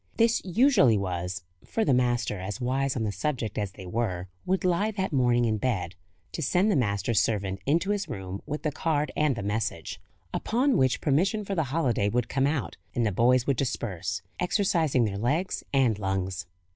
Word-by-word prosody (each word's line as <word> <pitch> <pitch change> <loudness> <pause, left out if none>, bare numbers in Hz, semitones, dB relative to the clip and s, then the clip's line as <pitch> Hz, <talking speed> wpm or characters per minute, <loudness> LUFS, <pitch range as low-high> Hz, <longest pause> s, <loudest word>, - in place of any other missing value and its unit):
This 230 0 +3
usually 190 - +4
was 90 0 -3 0.2
(for 225 - -1
the 140 - +3
master, 120 -4 +1
as 95 +5 -5
wise 130 +2 0
on 115 - -1
the 105 - -1
subject 110 +1 -2
as 100 -3 -3
they 95 - -10
were, 90 -3 -2 0.2
would 185 0 +1
lie 185 +4 +2
that 190 -6 -2
morning 120 -2 +3
in 110 -1 +1
bed) 100 -9 -1 0.4
to - - -4
send 180 +8 +2
the - - +2
master's 100 -3 +1
servant 100 -3 0
into 170 +7 +2
his 205 -1 -2
room 95 0 -5
with 150 +2 -4
the 155 - 0
card 150 0 0
and 150 -3 +2
the 110 - -4
message; 100 -5 -3 0.3
upon 255 +4 +1
which 130 -7 +2
permission 190 +9 +1
for 195 - -3
the 160 -5 +1
holiday 125 -8 +1
would 120 +1 0
come 135 0 +2
out, 145 -3 -2 0.2
and 120 - +1
the 105 - +1
boys 125 +5 +3
would 140 -3 +1
disperse, 110 -10 -2 0.2
exercising 170 - +2
their 100 -2 -3
legs 150 - 0
and 125 -7 +2
lungs. 95 -1 -2
125 Hz, 190 wpm, -27 LUFS, 100-160 Hz, 0.4 s, usually